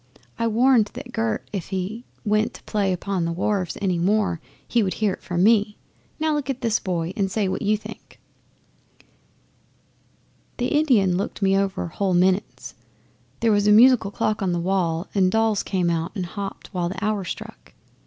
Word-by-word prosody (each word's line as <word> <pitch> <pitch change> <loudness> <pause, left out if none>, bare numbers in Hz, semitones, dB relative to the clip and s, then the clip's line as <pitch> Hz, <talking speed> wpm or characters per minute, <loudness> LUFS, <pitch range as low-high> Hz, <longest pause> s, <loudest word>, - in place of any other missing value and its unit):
I 230 - +1
warned 230 -1 +4
that 245 - -8
Gert 225 -1 -1
if 190 -5 -4
he 195 +5 -4 0.2
went 215 +1 +1
to - - -13
play 200 -3 0
upon 185 0 -2
the 170 - -1
wharves 185 +1 -1
any 180 -3 +1
more 195 -2 +1 0.3
he 240 - +2
would 190 -3 -1
hear 210 -3 0
from 175 0 -1
me. 210 -1 +3 0.4
Now 315 0 +1
look 290 -2 -2
at 265 -2 -3
this 230 -2 +1
boy 175 -2 -2
and 195 -2 0
say 200 0 0
what 185 - -2
you 210 +1 +2
think." 215 - -12 2.4
'The 245 +1 -1
Indian 235 - +3
looked 200 +1 -3
me 195 0 +3
over 195 -1 0
whole 190 +1 0
minutes 185 +2 0 0.7
there 230 - +3
was 205 0 +2
a - - +6
musical 235 -1 +6
clock 210 +1 -1
on 185 -2 0
the 175 - 0
wall 175 -1 0
and 185 -2 +3
dolls 225 -1 +2
came 180 -3 0
out 165 0 -2
and 185 -3 -2
hopped 200 +3 -7
while 175 -2 -1
the 190 +3 -4
hour 210 -2 0
struck. 175 - -8
200 Hz, 180 wpm, -23 LUFS, 185-220 Hz, 2.4 s, a